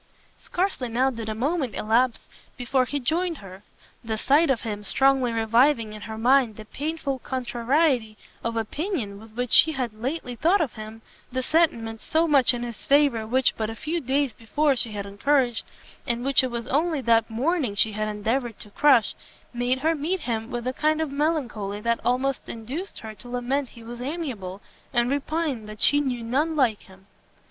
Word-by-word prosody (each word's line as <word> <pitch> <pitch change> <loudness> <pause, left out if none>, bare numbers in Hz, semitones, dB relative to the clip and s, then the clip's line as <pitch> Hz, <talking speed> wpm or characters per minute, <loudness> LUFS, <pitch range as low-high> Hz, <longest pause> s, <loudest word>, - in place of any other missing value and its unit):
Scarcely 350 -9 -2
now 255 +4 +2
did 225 -3 -6
a 215 - -2
moment 270 0 -1
elapse 230 +3 +1 0.3
before 255 +1 +1
he 285 +3 -2
joined 330 +5 0
her. 190 -3 -11 0.4
The 220 -1 -2
sight 290 +7 +3
of 255 -4 +2
him, 210 -3 -4
strongly 265 +3 +3
reviving 230 +1 +3
in 215 - -9
her 220 +1 -6
mind 245 -1 +3
the 215 - -10
painful 285 +1 -3
contrariety 250 -1 0 0.3
of 230 0 -2
opinion 225 - -3
with 220 0 -14
which 245 +1 -3
she 315 - +6
had 250 -6 -2
lately 250 +3 -4
thought 340 - +3
of 300 -9 -1
him, 220 +1 -9 0.3
the 260 +1 -2
sentiments 235 -9 +1
so 320 +1 +2
much 280 -5 +5
in 240 -1 -3
his 235 -2 -6
favour 275 -6 +3
which 260 +3 +2
but 220 -1 -2
a 225 - -5
few 330 +7 -2
days 270 -1 0
before 280 +6 +1
she 235 -3 -1
had 200 -1 -4
encouraged, 240 +4 +1 0.4
and 240 0 -1
which 275 -1 +4
it 260 - 0
was 235 -1 -4
only 310 +1 +1
that 230 -2 +3
morning 255 - 0
she 215 +1 +2
had 215 +1 -2
endeavoured 225 +3 -2
to 210 - -11
crush, 265 -3 +4 0.4
made 245 +2 0
her 320 +2 +3
meet 325 +4 -1
him 225 -1 -3
with 240 -2 -4
a 255 - -1
kind 310 +3 +1
of 315 -3 -1
melancholy 265 -9 -1
that 235 +2 0
almost 260 +2 0
induced 260 - -6
her 220 -1 -7
to 215 +4 -12
lament 250 +2 -1
he 230 - -14
was 240 +1 -8
amiable, 250 - -4 0.3
and 240 0 +2
repine 285 -5 -2
that 215 0 -9
she 290 +4 +4
knew 250 -4 -2
none 290 +8 0
like 245 -8 +2
him. 190 0 -18
245 Hz, 190 wpm, -25 LUFS, 225-285 Hz, 0.4 s, she